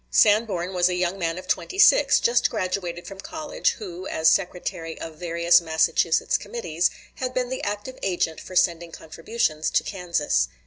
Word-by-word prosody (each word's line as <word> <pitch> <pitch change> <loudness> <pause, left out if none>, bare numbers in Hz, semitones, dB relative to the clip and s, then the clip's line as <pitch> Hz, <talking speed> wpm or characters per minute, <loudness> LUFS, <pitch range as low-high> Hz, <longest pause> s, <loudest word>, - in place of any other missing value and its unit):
Sanborn 205 -4 +3
was 180 0 +3
a 180 - -1
young 180 +2 -1
man 165 -1 -1
of 185 0 -9
twenty 380 - -2
six, - - +6
just 240 +1 +2
graduated 185 -4 -3
from 195 -1 -10
college, 310 +8 -2
who, 185 -3 -8
as 160 0 0
secretary 175 -3 -2
of 160 -1 -8
various 170 0 +3
Massachusetts 160 0 +1
committees, 175 -7 -1 0.3
had 255 -1 -4
been 250 -1 -1
the 260 - -4
active 210 +5 -4
agent 175 -4 -1
for 185 - -10
sending 170 -2 +1
contributions 160 -1 -2
to - - +1
Kansas. 170 - 0
180 Hz, 165 wpm, -24 LUFS, 170-205 Hz, 0.3 s, six